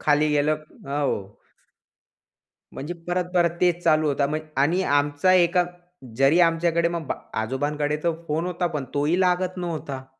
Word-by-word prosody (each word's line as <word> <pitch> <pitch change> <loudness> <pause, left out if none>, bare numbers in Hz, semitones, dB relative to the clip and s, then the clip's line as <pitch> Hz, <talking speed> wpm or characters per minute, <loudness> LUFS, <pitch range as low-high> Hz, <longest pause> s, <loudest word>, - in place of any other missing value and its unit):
खाली 150 0 +3
गेल 150 0 +2
हो. 145 -2 -2 1.6
म्हणजे 155 +6 -5
परत, 180 0 0
परत 175 -1 +4
तेच 175 -1 +2
चालू 155 -1 +3
होत 140 0 0
म्ह 155 +1 -1 0.2
आणि 170 +6 +2 0.2
आमचा 145 +5 +2
एका 180 0 +4 0.5
जरी 135 +6 +4
आमच्याकडे 170 0 +1
मग 170 -3 -4
बा - - -1 0.3
आजोबांकडे 145 +5 -1
तर 170 - +2 0.2
फोन 160 +3 -1
होता, 180 0 -1
पण 150 -5 -3
तोही 150 +6 +1
लागत 185 0 +1
नव्हता. 155 -7 -5
155 Hz, 145 wpm, -24 LUFS, 145-175 Hz, 1.6 s, परत